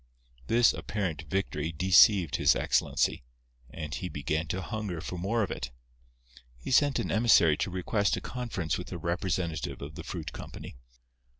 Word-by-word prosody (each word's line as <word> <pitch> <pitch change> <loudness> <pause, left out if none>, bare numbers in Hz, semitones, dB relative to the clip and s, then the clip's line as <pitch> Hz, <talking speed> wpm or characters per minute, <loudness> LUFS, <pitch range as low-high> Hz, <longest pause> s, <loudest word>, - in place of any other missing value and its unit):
This 120 0 +4
apparent 95 -5 -3
victory 85 -5 -2
deceived 95 +1 +5
His - - +4
Excellency; - - +1 0.5
and 75 +3 -6
he 90 - -4
began 75 +2 -2
to 95 +3 -3
hunger 105 -6 -4
for 90 +2 -6
more 110 +5 0
of 100 - -3
it. 65 - -4 0.9
He - - -7
sent 145 +1 +4
an - - -2
emissary 105 -9 +5
to - - -1
request 95 +3 0
a - - -5
conference 115 -11 -3
with 90 - -8
a 90 - -4
representative 85 -1 -2
of 70 +2 -8
the 80 +1 -8
fruit 85 -2 -6
company. - - -9
90 Hz, 160 wpm, -29 LUFS, 80-100 Hz, 0.9 s, deceived